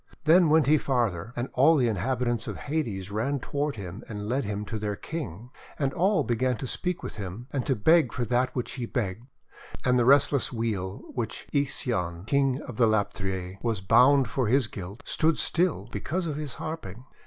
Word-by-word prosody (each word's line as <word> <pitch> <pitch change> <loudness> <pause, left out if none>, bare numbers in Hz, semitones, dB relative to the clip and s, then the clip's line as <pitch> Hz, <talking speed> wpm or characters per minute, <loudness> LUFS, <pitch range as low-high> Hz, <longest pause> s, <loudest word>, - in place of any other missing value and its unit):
Then 165 +1 +6
went 155 0 +5
he 150 +1 +4
farther, 115 -8 -1
and 120 +2 -2
all 145 +6 +5
the 125 -3 +3
inhabitants 120 +2 -1
of - - -4
Hades 110 -11 -3
ran 130 +7 -1
toward 145 +3 -2
him 95 -1 -7
and 105 -1 -5
led 130 +2 0
him 105 0 -3
to 110 0 -4
their 105 -1 -2
King. 120 - -6 0.3
And 135 -2 0
all 195 +4 +2
began 125 +1 0
to 130 - -5
speak 180 +7 -3
with - - -6
him, 100 +3 -6
and 135 -4 -2
to 135 - +2
beg 155 +4 +4
for 120 - -2
that 125 +3 +2
for - - -28
which 125 - -3
he 125 -3 -4
begged. 115 0 -3 0.6
And 125 -1 +4
the 120 - +3
restless 140 +1 +4
wheel 105 -5 -3
which 120 -3 -4
Ixion 115 - 0
the - - -13
King 135 +2 +1
of 120 - -8
the 115 - +5
Lapithse 95 -3 -2
was 115 -4 -1
bound 130 +8 +5
to - - -9
for 130 -4 0
his 130 +1 +3
guilt, 100 +1 -8
stood 160 -1 +2
still 175 0 +1
because 180 +4 -2
of 155 -3 -2
his 150 -4 -5
harping. 125 - -6
125 Hz, 200 wpm, -27 LUFS, 105-140 Hz, 0.6 s, Then